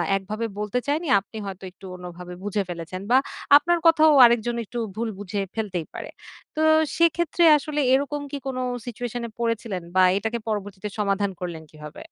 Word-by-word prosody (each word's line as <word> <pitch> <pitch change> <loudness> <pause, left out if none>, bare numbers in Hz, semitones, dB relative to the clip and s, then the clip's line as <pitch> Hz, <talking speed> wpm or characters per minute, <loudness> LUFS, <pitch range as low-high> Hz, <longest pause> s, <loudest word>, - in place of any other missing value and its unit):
একভাবে 215 +4 -3
বলতে 210 +4 -1
চায়নি, 310 +3 0
আপনি 205 +3 -12
হয়তো 195 -1 -7
একটু 190 +1 -16
অন্যভাবে 180 0 -9
বুঝে 205 0 -1
ফেলেছেন 175 +2 -6
বা 255 - +7 0.4
আপনার 345 +3 +1
কথাও 315 -1 +6
আরেকজন 235 0 +2
একটু 240 +3 -8 0.2
ভুল 230 0 -2
বুঝে 205 0 -3
ফেলতেই 190 -7 -3
পারে। - - -7 0.5
তো - - -3 0.4
সেক্ষেত্রে 335 0 +2
আসলে 295 +1 -4
এরকম 285 +2 0
কি 285 - -3
কোন 260 -1 -3 0.3
সিচুয়েশন 245 0 -5
এ - - -10
পড়েছিলেন 230 -5 -2
বা 185 - +6
এটাকে 220 +3 -2
পরবর্তীতে 205 -1 -4
সমাধান 200 -1 0
করলেন 170 -3 -5
কিভাবে? 150 - -11
215 Hz, 165 wpm, -24 LUFS, 190-255 Hz, 0.5 s, বা